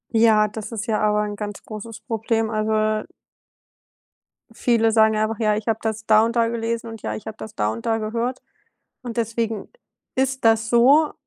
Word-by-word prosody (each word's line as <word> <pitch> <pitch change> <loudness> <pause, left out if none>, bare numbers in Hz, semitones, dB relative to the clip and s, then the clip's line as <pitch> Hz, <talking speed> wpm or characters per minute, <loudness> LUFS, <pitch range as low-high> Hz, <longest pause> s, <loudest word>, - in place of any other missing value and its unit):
Ja, 220 -1 +5
das 210 +1 -7
ist 220 -2 -4
ja 220 -3 0
aber 210 0 +2
ein 210 0 -3
ganz 205 -1 -6
großes 220 +1 -8
Problem, 225 -1 -1
also 215 0 -1 0.3
äh. - - -12 1.5
Viele 225 -1 +2
sagen 220 -1 +4
einfach: 215 0 -1
„Ja, 215 -2 +2
ich 215 +1 -5
habe 225 -1 +1
das 220 0 -3
da 215 0 +5
und 230 +1 -2
da 230 -1 +3
gelesen 230 0 -2
und 225 -1 -8
ja, - - -3
ich 215 - -9
habe 220 0 -6
das 215 - -9
da 105 - 0
und 115 +1 -7
da 225 - +1
gehört“. 230 +3 -3 0.6
Und 240 -1 -6
deswegen 225 -2 -2 0.5
ist 265 -1 0
das 225 0 +3
so, 275 +6 +5
225 Hz, 190 wpm, -22 LUFS, 215-230 Hz, 1.5 s, Ja